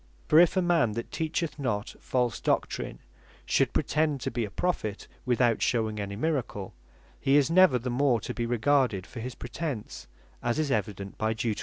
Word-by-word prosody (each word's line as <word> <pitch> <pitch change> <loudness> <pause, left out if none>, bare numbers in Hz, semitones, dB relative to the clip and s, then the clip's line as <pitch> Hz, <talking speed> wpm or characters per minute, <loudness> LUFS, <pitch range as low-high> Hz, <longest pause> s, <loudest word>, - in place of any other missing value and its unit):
For 155 - +6
if 175 +2 +5
a 185 - +3
man 165 -11 +2
that 115 +2 -5
teacheth 160 -1 -2
not 110 -6 -2
false 125 -3 -1
Doctrine, - - -1 0.4
should - - +2
pretend 150 -2 +1
to - - -2
bee 115 0 -1
a - - -7
Prophet 110 - -2 0.2
without 120 -2 +2
shewing 110 -3 0
any 100 -1 -4
Miracle, 120 -7 -2 0.5
he 135 +1 +4
is 145 +2 +3
never 185 -6 +6
the 125 +1 -3
more 125 -1 +2
to - - -5
bee 120 -1 -2
regarded 120 -4 +2
for 120 - -9
his 125 +2 -5
pretence, 120 - -5 0.3
as 120 -1 0
is 155 -3 0
evident 100 -6 -3
by 110 0 +1
Deut. 110 -1 -2
125 Hz, 180 wpm, -28 LUFS, 110-145 Hz, 0.5 s, For